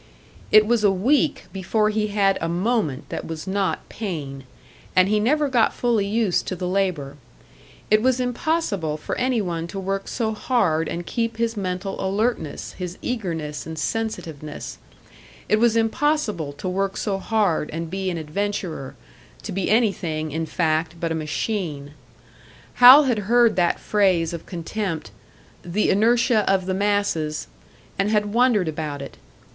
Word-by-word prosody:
It 215 Hz, 0 st, +7 dB
was 230 Hz, 0 st, +1 dB
a 205 Hz, -, +6 dB
week 265 Hz, -, +1 dB
before 210 Hz, +3 st, +1 dB
he 210 Hz, 0 st, 0 dB
had 200 Hz, -2 st, +2 dB
a 165 Hz, -, -1 dB
moment 175 Hz, -, -1 dB
that -, -, -4 dB
was 160 Hz, -1 st, -6 dB
not 195 Hz, 0 st, -1 dB
pain; 145 Hz, -10 st, -5 dB, 0.5 s
and 185 Hz, 0 st, +5 dB
he 210 Hz, +1 st, +2 dB
never 290 Hz, +7 st, +2 dB
got 245 Hz, -4 st, +2 dB
fully 230 Hz, -5 st, +1 dB
used 215 Hz, -3 st, +1 dB
to 185 Hz, -, -2 dB
the 180 Hz, 0 st, -4 dB
labour. 180 Hz, -7 st, -1 dB, 0.7 s
It 215 Hz, 0 st, +5 dB
was 255 Hz, +1 st, +2 dB
impossible 245 Hz, -, -1 dB
for -, -, -4 dB
any 250 Hz, -2 st, +1 dB
one 170 Hz, -2 st, -3 dB
to 195 Hz, -, -6 dB
work 195 Hz, +1 st, -3 dB
so 220 Hz, -2 st, -1 dB
hard 175 Hz, -9 st, +1 dB
and 175 Hz, 0 st, -4 dB
keep 230 Hz, +1 st, -2 dB
his 230 Hz, 0 st, 0 dB
mental 195 Hz, 0 st, -3 dB
alertness, 195 Hz, -5 st, -2 dB
his 180 Hz, -1 st, -6 dB
eagerness 165 Hz, -, -3 dB
and 160 Hz, 0 st, -6 dB
sensitiveness; 160 Hz, -9 st, -4 dB, 0.7 s
it 215 Hz, -, +3 dB
was 235 Hz, 0 st, +3 dB
impossible 225 Hz, -, 0 dB
to 165 Hz, -, -6 dB
work 195 Hz, +1 st, -1 dB
so 195 Hz, -2 st, -1 dB
hard 200 Hz, -8 st, 0 dB
and 165 Hz, +1 st, -5 dB
be 190 Hz, 0 st, -2 dB
an 175 Hz, -, -3 dB
adventurer 165 Hz, -3 st, -4 dB, 0.5 s
to -, -, -5 dB
be 195 Hz, 0 st, -1 dB
anything, 175 Hz, -9 st, +1 dB
in 160 Hz, +2 st, -2 dB
fact, 160 Hz, 0 st, 0 dB
but 165 Hz, -1 st, -2 dB
a -, -, +1 dB
machine. 155 Hz, -2 st, -3 dB, 0.9 s
Hal 260 Hz, +5 st, +11 dB
had 245 Hz, -6 st, +1 dB
heard 240 Hz, -1 st, +5 dB
that 175 Hz, -2 st, +2 dB
phrase 185 Hz, -6 st, +2 dB
of 170 Hz, -, -7 dB
contempt, 170 Hz, -, -4 dB, 0.5 s
"the 180 Hz, +5 st, 0 dB
inertia 230 Hz, +2 st, +3 dB
of 190 Hz, -1 st, +1 dB
the 190 Hz, -, -1 dB
masses," 190 Hz, -6 st, 0 dB, 0.5 s
and 195 Hz, +1 st, +2 dB
had 210 Hz, -1 st, +1 dB
wondered 235 Hz, -6 st, +3 dB
about 150 Hz, -2 st, -4 dB
it. -, -, -10 dB
195 Hz, 155 wpm, -23 LUFS, 165-220 Hz, 0.9 s, Hal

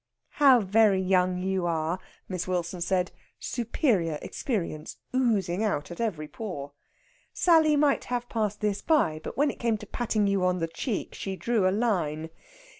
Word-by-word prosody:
"How 265 Hz, -5 st, +7 dB
very 205 Hz, 0 st, +4 dB
young 185 Hz, -1 st, +2 dB
you 190 Hz, -2 st, 0 dB
are!" 165 Hz, +2 st, -1 dB, 0.3 s
Miss 180 Hz, -2 st, -3 dB
Wilson 180 Hz, -1 st, -2 dB
said, 180 Hz, +1 st, 0 dB, 0.3 s
superior 220 Hz, -, 0 dB
experience 165 Hz, -, -3 dB, 0.2 s
oozing 215 Hz, -7 st, +1 dB
out 175 Hz, -8 st, -1 dB
at 175 Hz, -, -6 dB
every 170 Hz, -10 st, -2 dB
pore. 150 Hz, -9 st, -6 dB, 0.6 s
Sally 320 Hz, -3 st, +4 dB
might 290 Hz, -1 st, +2 dB
have 245 Hz, -1 st, -2 dB
passed 215 Hz, -3 st, -2 dB
this 210 Hz, -1 st, 0 dB
by, 160 Hz, -, +2 dB
but -, -, -7 dB
when 290 Hz, +1 st, +3 dB
it -, -, -15 dB
came 230 Hz, -2 st, +1 dB
to 210 Hz, -, -10 dB
patting 215 Hz, -1 st, -1 dB
you 200 Hz, -2 st, +1 dB
on 180 Hz, 0 st, +2 dB
the 165 Hz, -2 st, -1 dB
cheek, 185 Hz, +7 st, -4 dB
she 195 Hz, -1 st, -4 dB
drew 220 Hz, -1 st, +1 dB
a -, -, +4 dB
line. 170 Hz, -8 st, -1 dB
195 Hz, 165 wpm, -27 LUFS, 175-230 Hz, 0.6 s, How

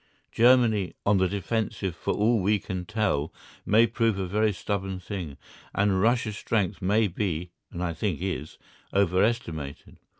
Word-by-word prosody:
Germany 115 Hz, -5 st, +4 dB
on 100 Hz, 0 st, +4 dB
the 95 Hz, -, +3 dB
defensive 100 Hz, -1 st, -2 dB
for -, -, -2 dB
all 110 Hz, +2 st, +3 dB
we 105 Hz, +3 st, +3 dB
can 95 Hz, -2 st, -5 dB
tell 105 Hz, -10 st, 0 dB, 0.4 s
may 110 Hz, +3 st, +6 dB
prove 115 Hz, -2 st, 0 dB
a 95 Hz, -, -1 dB
very 105 Hz, +4 st, +1 dB
stubborn 95 Hz, -1 st, -3 dB
thing, 90 Hz, -7 st, -6 dB, 0.4 s
and 100 Hz, -2 st, +2 dB
Russia's 115 Hz, -1 st, +1 dB
strength 100 Hz, -6 st, -1 dB
may 105 Hz, +4 st, +3 dB
be, 90 Hz, -2 st, -3 dB, 0.2 s
and 85 Hz, -, -4 dB
I 85 Hz, -1 st, -1 dB
think 90 Hz, 0 st, -2 dB
is, 90 Hz, -4 st, -4 dB, 0.3 s
overestimated. 90 Hz, -, 0 dB
100 Hz, 145 wpm, -27 LUFS, 90-110 Hz, 0.4 s, may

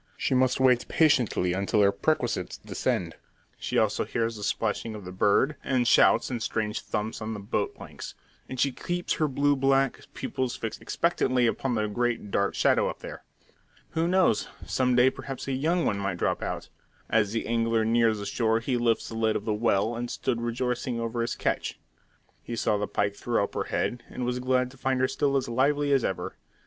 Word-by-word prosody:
She -, -, 0 dB
must 130 Hz, 0 st, +3 dB
wait 125 Hz, -2 st, +4 dB
patiently 125 Hz, -, +2 dB
until 100 Hz, +2 st, +2 dB
her 100 Hz, -, +5 dB
perquisites 120 Hz, -, -1 dB
descend. -, -, -2 dB, 0.4 s
She -, -, -2 dB
also -, -, +2 dB
hears 115 Hz, 0 st, -2 dB
the 105 Hz, -, -8 dB
splashing 110 Hz, +2 st, -1 dB
of 105 Hz, -3 st, -9 dB
the 90 Hz, -, -7 dB
bird, 105 Hz, +10 st, +2 dB
and 125 Hz, -3 st, +1 dB
shouts -, -, +5 dB
and 120 Hz, -2 st, -3 dB
strange 110 Hz, -1 st, -2 dB
thumps 110 Hz, +2 st, -3 dB
on 110 Hz, +1 st, -3 dB
the -, -, -6 dB
boat 100 Hz, -, -2 dB
planks; -, -, -9 dB, 0.3 s
and 130 Hz, -, -6 dB
she 140 Hz, -, +3 dB
keeps 175 Hz, +6 st, -2 dB
her 155 Hz, -, +4 dB
blue 145 Hz, +1 st, +2 dB
black 135 Hz, -1 st, +1 dB
pupils 130 Hz, -2 st, -2 dB
fixed 115 Hz, -, -5 dB
expectantly 130 Hz, -7 st, +1 dB
upon 125 Hz, +2 st, 0 dB
the 110 Hz, -1 st, +1 dB
great 115 Hz, -1 st, -1 dB
dark 100 Hz, 0 st, +1 dB
shadow -, -, +3 dB
up -, -, -8 dB
there. -, -, -8 dB, 0.7 s
Who 165 Hz, +1 st, 0 dB
knows, 180 Hz, -, +3 dB, 0.2 s
some 125 Hz, -1 st, +1 dB
day 125 Hz, +2 st, +5 dB
perhaps 135 Hz, 0 st, -7 dB
a -, -, -1 dB
young 160 Hz, +6 st, +1 dB
one 100 Hz, -, 0 dB
might 100 Hz, -2 st, -2 dB
drop -, -, 0 dB
out! -, -, -4 dB, 0.4 s
As 105 Hz, -2 st, +2 dB
the 115 Hz, -, -2 dB
angler 115 Hz, -1 st, +1 dB
neared 115 Hz, 0 st, +3 dB
the 100 Hz, -, -5 dB
shore 115 Hz, +1 st, +1 dB
he 125 Hz, +2 st, -1 dB
lifted 120 Hz, -1 st, +1 dB
the 115 Hz, -, -5 dB
lid 110 Hz, -1 st, +2 dB
of 105 Hz, -, -3 dB
the 110 Hz, -, 0 dB
well, 110 Hz, 0 st, +1 dB
and 120 Hz, +1 st, -4 dB
stood 120 Hz, -1 st, -2 dB
rejoicing 120 Hz, 0 st, -2 dB
over 115 Hz, 0 st, -2 dB
his 115 Hz, -, -1 dB
catch. -, -, -2 dB, 0.6 s
He 120 Hz, -, -5 dB
saw 105 Hz, -2 st, +1 dB
the 105 Hz, -, -1 dB
pike 100 Hz, 0 st, -1 dB
throw 115 Hz, 0 st, 0 dB
up -, -, -4 dB
her -, -, -2 dB
head, 120 Hz, -, -2 dB
and 125 Hz, -, -4 dB
was 125 Hz, 0 st, -1 dB
glad 125 Hz, 0 st, +1 dB
to 135 Hz, -, -16 dB
find 130 Hz, 0 st, 0 dB
her 130 Hz, -, +3 dB
still 140 Hz, +1 st, +1 dB
as 135 Hz, -, -1 dB
lively 140 Hz, +4 st, +2 dB
as 135 Hz, -3 st, +3 dB
ever. 95 Hz, -, -3 dB
120 Hz, 205 wpm, -27 LUFS, 110-130 Hz, 0.7 s, her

